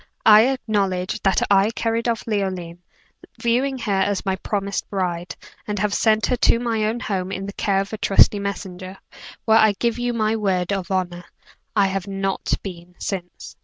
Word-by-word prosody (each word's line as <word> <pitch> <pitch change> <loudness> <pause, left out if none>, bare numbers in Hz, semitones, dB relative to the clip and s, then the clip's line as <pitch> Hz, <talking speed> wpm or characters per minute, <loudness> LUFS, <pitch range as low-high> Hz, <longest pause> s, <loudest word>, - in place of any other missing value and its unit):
I 220 +2 +8
acknowledge 200 -8 -1
that 195 -1 +2
I 200 +1 +5
carried 230 +1 -1
off 230 -2 -2
Leoline, 185 -5 -3 0.6
viewing 260 +3 +1
her 225 -5 -2
as 200 0 0
my 190 -1 +1
promised 200 0 -3
bride, 180 -3 -3 0.3
and 210 0 -2
have 205 +1 0
sent 220 0 +3
her 250 - +1
to 230 - +4
my 225 -3 0
own 225 +3 -1
home 190 -4 -3
in 195 0 -4
the 200 - -6
care 195 -1 0
of 195 +2 -7
a 215 - -4
trusty 205 +1 +5
messenger, 190 -2 -6 0.5
where 220 0 +5
I 215 -1 +5
give 235 0 0
you 245 0 0
my 220 -1 +1
word 190 -3 0
of 190 -2 -3
honor, 180 -2 -2 0.5
I 200 -2 +4
have 195 0 -2
not 195 0 -2
been 180 -2 -9
since. 180 -3 -6
200 Hz, 180 wpm, -22 LUFS, 190-220 Hz, 0.6 s, I